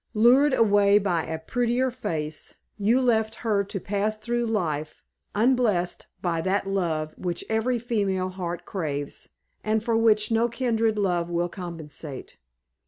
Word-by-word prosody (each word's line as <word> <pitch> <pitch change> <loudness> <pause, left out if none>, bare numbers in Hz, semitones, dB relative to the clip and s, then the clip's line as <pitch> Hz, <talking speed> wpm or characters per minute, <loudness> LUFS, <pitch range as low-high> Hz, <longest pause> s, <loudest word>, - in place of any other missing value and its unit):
Lured 260 +6 +5
away 205 -2 +5
by 180 -5 0
a 160 - -3
prettier 245 +8 0
face, 155 -11 -5 0.2
you 220 +5 +3
left 225 -3 +2
her 205 -3 +2
to 195 0 -4
pass 205 +3 -1
through 235 +2 -1
life, 155 -9 -2 0.3
unblessed 215 -6 +1 0.2
by 170 -2 0
that 190 +3 0
love 160 -5 -1
which 175 -2 -3
every 225 +3 +1
female 200 -6 -1
heart 175 -2 -5
craves, 145 -6 -4 0.3
and 215 0 +1
for 230 -1 +1
which 220 -1 +3
no 230 +1 +3
kindred 230 -2 0
love 175 -4 0
will 175 0 0
compensate. 165 -6 -8
205 Hz, 140 wpm, -25 LUFS, 175-225 Hz, 0.3 s, Lured